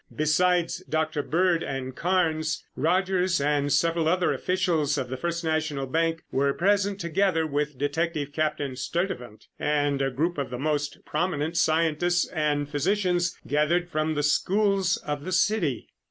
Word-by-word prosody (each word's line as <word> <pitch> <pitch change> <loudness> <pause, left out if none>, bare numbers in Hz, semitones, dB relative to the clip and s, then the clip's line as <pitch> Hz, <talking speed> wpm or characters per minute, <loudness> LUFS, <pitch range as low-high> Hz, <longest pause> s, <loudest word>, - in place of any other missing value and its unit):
Besides 170 +3 +2
Dr. 155 -1 0
Bird 170 +2 +1
and 130 -1 -4
Carnes, 160 -3 0
Rogers 185 +1 +1
and 145 0 +1
several 165 +1 +2
other 180 +2 +2
officials 170 -6 0
of 130 -3 -3
the 130 - -3
First 170 +5 -3
National 155 -3 -1
Bank 165 +4 0
were 140 +1 +1
present, 200 +1 +1
together 170 -1 +1
with 150 -1 -2
Detective 145 0 -2
Captain 150 -3 -1
Sturtevant 125 - -4
and 145 -2 +1
a 135 - +1
group 155 +5 -1
of 140 - -2
the 125 - -5
most 145 +1 -2
prominent 160 -1 -1
scientists 165 +1 +2
and 150 -3 0
physicians 175 +3 0
gathered 165 +5 +1
from 155 0 0
the 145 - 0
schools 195 +4 +2
of 145 -1 -5
the 185 - -5
city. 185 - +1
160 Hz, 145 wpm, -26 LUFS, 145-175 Hz, -, Besides